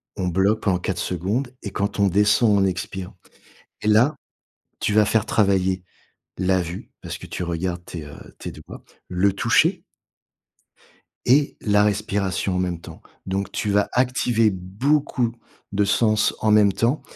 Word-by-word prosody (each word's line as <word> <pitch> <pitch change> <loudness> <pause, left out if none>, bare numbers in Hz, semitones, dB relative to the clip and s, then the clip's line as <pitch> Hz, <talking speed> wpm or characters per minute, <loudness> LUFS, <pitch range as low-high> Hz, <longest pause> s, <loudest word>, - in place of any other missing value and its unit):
on 90 - -2
bloque 95 +5 +2
pendant 95 -3 +1
4 90 0 -3
secondes 105 - -2
et 100 - -5
quand 100 +1 -2
on 100 - +4
descend, 105 +4 +3
on 100 - +3
expire 95 0 -4 0.7
et 105 - -3
là, 120 +8 +4 0.6
tu 105 - 0
vas 105 0 +5
faire 110 +1 +1
travailler 95 -4 +1 0.6
la 95 0 +2
vue, 85 +2 -7
parce - - -5
que - - -10
tu - - -5
regardes 85 +1 -3
tes, 85 -3 -7
heu, 70 -1 -12
tes - - -6
doigts, - - -12 0.2
le 95 +2 +2
toucher 100 - +2 1.4
et 140 +3 +3
la 105 -1 +3
respiration 100 -2 -1
en - - 0
même 90 -2 -2
temps. - - -12 0.2
Donc 95 +1 -2
tu 105 - -2
vas 100 0 +2
activer 125 -3 +2
beaucoup 115 +7 0 0.4
de 100 +1 +2
sens 110 +1 +2
en 110 - +2
même 105 -2 +5
temps 120 +9 0
100 Hz, 155 wpm, -23 LUFS, 95-110 Hz, 1.4 s, vas